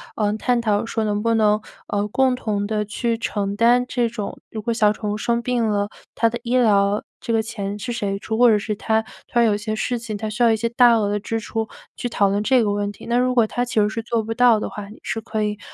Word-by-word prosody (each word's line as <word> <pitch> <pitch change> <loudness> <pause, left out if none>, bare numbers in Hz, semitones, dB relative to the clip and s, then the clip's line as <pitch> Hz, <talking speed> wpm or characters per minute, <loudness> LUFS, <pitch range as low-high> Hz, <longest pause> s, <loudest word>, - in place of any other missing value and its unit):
呃， 210 -1 +1
探 245 +2 +1
讨 215 -2 +1
说 225 -1 -1
能 210 -1 0
不 230 +1 +2
能， 215 -1 +3 0.3
呃， 205 0 -1
共 260 +4 +2
同 215 -5 -2
地 210 0 -1
去 230 +3 -1
承 205 -3 -2
担 240 +3 +4
这 240 -2 0
种 220 -3 -6
如 220 - -6
果 235 +1 0
小 215 -2 +3
宠 210 0 -3
物 - - -1
生 235 +2 0
病 240 -3 0
了， 205 -1 0 0.3
它 230 - +3
的 240 +1 -5
医 245 +1 0
疗 205 -3 +3 0.2
这 - - -3
个 225 -1 +2
钱 205 -2 -4
是 240 +4 -5
谁 205 -4 -2
出， 220 +2 -4
或 245 -1 +7
者 215 - +5
是 210 +1 -3
它 220 +1 0 0.2
它 240 -1 +2
有 215 -3 +3
些 215 +1 -3
事 245 +2 -1
情 225 -2 -5
它 215 +1 -4
需 225 +3 -4
要 235 -1 +6
一 220 - +2
些 230 +2 -1
大 235 0 +5
额 205 -1 0
支 225 +2 -3
出， 225 0 -3 0.3
去 245 - -4
讨 200 -4 +2
论 200 +1 0
这 250 +2 +3
个 205 - +1
问 205 0 -1
题。 - - -13
那 240 +1 +1
如 250 0 +1
果 235 -3 +5
他 245 +3 -2
其 240 -2 0
实 210 - +4
是 220 +2 -3
做 230 0 -1
不 225 +1 -3
到 240 -2 +5
的 - - -3
话， 205 -1 -7
你 215 - -12
是 225 - -3
可 220 -1 -2
以， 210 0 -2
220 Hz, 285 characters per minute, -22 LUFS, 210-235 Hz, 0.3 s, 或